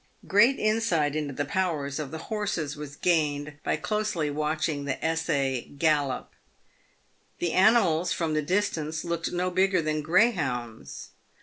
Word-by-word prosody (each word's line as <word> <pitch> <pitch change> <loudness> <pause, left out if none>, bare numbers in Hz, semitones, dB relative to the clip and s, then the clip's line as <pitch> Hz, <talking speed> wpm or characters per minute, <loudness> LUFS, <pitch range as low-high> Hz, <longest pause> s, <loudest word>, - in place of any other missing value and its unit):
Great 235 +7 +5
insight 215 -10 +1
into 150 -2 -2
the 145 +2 -2
powers 155 -5 -1
of 150 -3 -4
the 160 - -6 0.2
horses 175 -8 -2
was 145 -1 -8
gained 150 -3 0
by - - +1
closely 210 -8 -1
watching 155 0 -1
the 135 - -2
essay 145 -6 0 0.2
gallop. 145 -3 +1 1.1
The 175 - -1
animals, 185 -5 +4
from 165 -2 -1
the 155 - +1
distance, 160 -3 -1
looked 170 -1 -2
no 180 +1 -1
bigger 185 +1 +3
than 155 -1 -1
greyhounds. 145 - 0
155 Hz, 135 wpm, -27 LUFS, 145-185 Hz, 1.1 s, Great